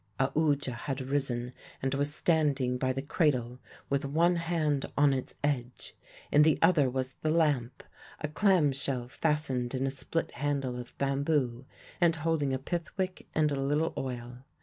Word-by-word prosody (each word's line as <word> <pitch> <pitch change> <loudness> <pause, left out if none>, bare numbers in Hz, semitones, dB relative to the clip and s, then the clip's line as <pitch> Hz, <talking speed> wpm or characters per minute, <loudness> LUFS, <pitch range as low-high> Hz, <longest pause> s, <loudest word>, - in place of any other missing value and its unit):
Aoodya 140 0 +1
had 135 +3 -4
risen 130 -2 -2 0.3
and 135 0 -1
was 145 +1 +2
standing 145 -6 +1
by 130 0 +1
the 135 +1 -3
cradle, 130 -6 0 0.3
with 140 -1 0
one 165 +5 +2
hand 160 -4 0
on 145 -1 +5
its 130 -1 -4
edge; 130 -4 -2 0.4
in 150 - +6
the 155 0 +5
other 165 -6 +4
was 130 +1 -2
the 155 - 0
lamp 150 -7 +1 0.4
a 150 - -2
clam 170 -2 +3
shell 130 -2 -3
fastened 135 -3 -1
in 130 +1 0
a 135 - 0
split 150 +4 -2
handle 140 -3 -2
of 120 - -10
bamboo, 135 -3 0 0.3
and 170 -2 +4
holding 155 -3 0
a 130 - +1
pith 170 +5 -3
wick 185 -1 -3
and 155 -1 +3
a 140 -1 -1
little 150 +4 +1
oil. 125 -1 -5
140 Hz, 165 wpm, -30 LUFS, 130-155 Hz, 0.4 s, in